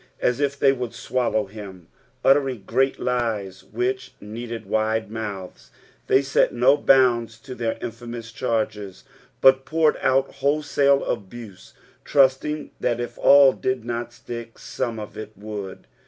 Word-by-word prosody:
As 125 +2 +1
if 140 -1 0
they 135 -1 +4
would 125 -3 -5
swallow 120 -4 -1
him. 95 -4 -11 0.4
tltteriag 135 -6 +3
great 135 +5 +1
lies 110 -7 -2
which 125 +6 -3
needed 115 +2 -7
wide 110 -1 -1
mouths. 100 -5 -7 0.4
They 135 - +4
set 140 - +2
no 125 +4 +4
bounds 120 -5 +3
to 130 +1 -8
their 115 -2 -2
infamous 115 0 -7
charges, 110 -4 -3 0.4
but 135 0 +6
poured 155 +1 +2
out 135 +1 +1
wholesale 140 -1 +2
al>use, 100 -1 -7 0.3
trusting 145 +2 +2
that 120 -1 0
if 120 - -5
all 140 -2 +7
did 130 -3 -2
not 120 0 -4
stick, 115 -1 -9
some 120 -4 -4
of 105 - -8
it 110 0 -8
would. 105 -2 -7
120 Hz, 140 wpm, -23 LUFS, 110-135 Hz, 0.4 s, all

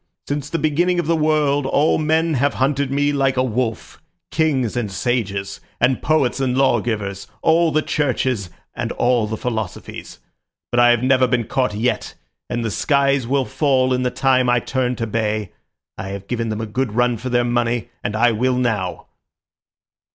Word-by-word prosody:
Since 145 0 -3
the 165 - -1
beginning 175 +3 +1
of 175 - -1
the 165 +2 +2
world 150 -3 +1
all 150 +4 +2
men 160 +1 +1
have 140 +1 +1
hunted 140 +1 0
me 145 +1 +1
like 135 -2 +1
a 130 - +3
wolf—kings 130 +3 -2
and 115 -5 -2
sages, 100 -2 -2 0.2
and 125 +1 +2
poets 145 -5 +1
and 130 -1 0
lawgivers, 110 -7 0 0.2
all 165 +1 +4
the 155 +1 +1
churches, 130 -8 -1 0.3
and - - -3
all 120 -3 +1
the 110 +1 -4
philosophies. 110 -6 -5 0.5
But 120 - +2
I 120 0 +6
have 120 0 +3
never 130 0 +4
been 120 -1 +1
caught 125 -4 -1
yet, 120 +4 -1 0.3
and 120 -1 -2
the 110 - -1
skies 140 -2 +1
will 135 +1 +1
fall 130 +2 +1
in 125 - 0
the 125 - +1
time 130 -1 +2
I 120 0 +4
turn 125 +1 -1
to 115 - -3
bay. 110 -2 -2 0.5
I 95 - -5
have 100 0 -6
given 115 -2 -2
them 110 0 -3
a - - -2
good 115 +1 -2
run 120 0 +2
for 130 +4 -5
their 120 0 +2
money, 120 -2 -1
and 105 - -2
I 120 +2 +4
will 125 +3 +1
now." 110 -7 -1
125 Hz, 180 wpm, -20 LUFS, 115-140 Hz, 0.5 s, I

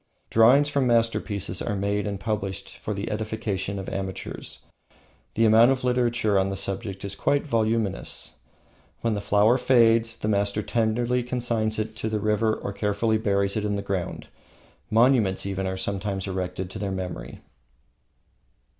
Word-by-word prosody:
Drawings 125 +6 +6
from 140 -3 +1
masterpieces 115 -4 0
are 105 - -2
made 100 +1 -1
and 100 -2 -3
published 100 -2 -3
for - - -5
the 100 +3 -4
edification 105 -2 -3
of 95 - -6
amateurs. 95 -1 -6 0.7
The 115 - +3
amount 110 +2 +7
of 135 -1 0
literature 120 -5 +2
on 95 0 +1
the 95 - -3
subject 95 0 -5
is 100 - -3
quite 140 +8 0
voluminous. 110 -6 -1 0.6
When 115 -1 +1
the 100 - -2
flower 105 +5 +3
fades, 115 -3 +4
the - - -4
master 100 0 +1
tenderly 120 +3 +1
consigns 120 -3 -1
it 110 0 -3
to 110 - -2
the 110 -1 -1
river 110 +1 +1
or 100 - -5
carefully 105 +2 0
buries 100 -2 +1
it 110 - -1
in 105 -1 0
the 100 - -3
ground. 95 -3 -3 0.6
Monuments 115 -5 +3
are 95 -1 -2
sometimes 95 0 -2
erected 95 -1 -4
to 105 - -7
their 100 -1 -2
memory. 90 -9 -6
105 Hz, 155 wpm, -25 LUFS, 100-115 Hz, 0.7 s, amount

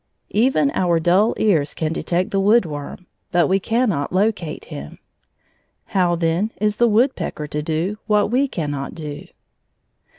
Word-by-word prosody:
Even 210 - +3
our 175 -2 +1
dull 185 +7 +3
ears 160 -9 +1
can 160 0 -2
detect 175 +3 -1
the 195 - +1
woodworm, 180 -6 0 0.3
but 175 -2 +3
we 190 +1 +2
cannot 215 - 0
locate 185 -5 -1
him. 70 +1 -9 0.9
How, 180 -3 +1
then, 170 +5 0
is 210 0 0
the 240 - +4
woodpecker 230 - 0
to 150 0 -3
do 165 +7 -2
what 210 0 +2
we 270 +3 +2
cannot 145 - -4
do? 150 -3 -7
180 Hz, 140 wpm, -21 LUFS, 155-210 Hz, 0.9 s, the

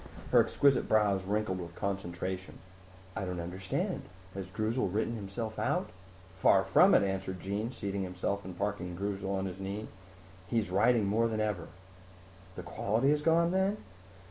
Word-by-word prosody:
Her - - +7
exquisite 140 -3 +3
brows 100 -3 +3
wrinkled 100 -2 -1
with 85 -1 -7
concentration. 95 -1 -4 0.6
"I 100 - -2
don't 90 -2 -3
understand. 90 +2 -2 0.3
Has 95 -1 -5
Droozle 110 +2 -1
written 110 +3 0
himself 110 +2 -5
out?" - - 0 0.4
"Far 95 - +4
from - - +6
it," - - +5
answered 95 -1 -2
Jean, 100 +6 -2
seating 100 -5 -3
himself 95 +2 -2
and 90 -1 -8
parking 100 -3 -2
Droozle 100 0 -3
on 95 -1 -1
his 95 0 -5
knee. 100 +3 -4 0.6
"He's 110 -4 0
writing 110 +3 +4
more 110 +4 +2
than 110 -1 -2
ever." 105 -5 -1 0.9
"The 90 - -6
quality 110 - +1
is 150 0 +2
gone, 165 +2 +3
then?" 190 +2 +2
100 Hz, 155 wpm, -31 LUFS, 95-110 Hz, 0.9 s, Her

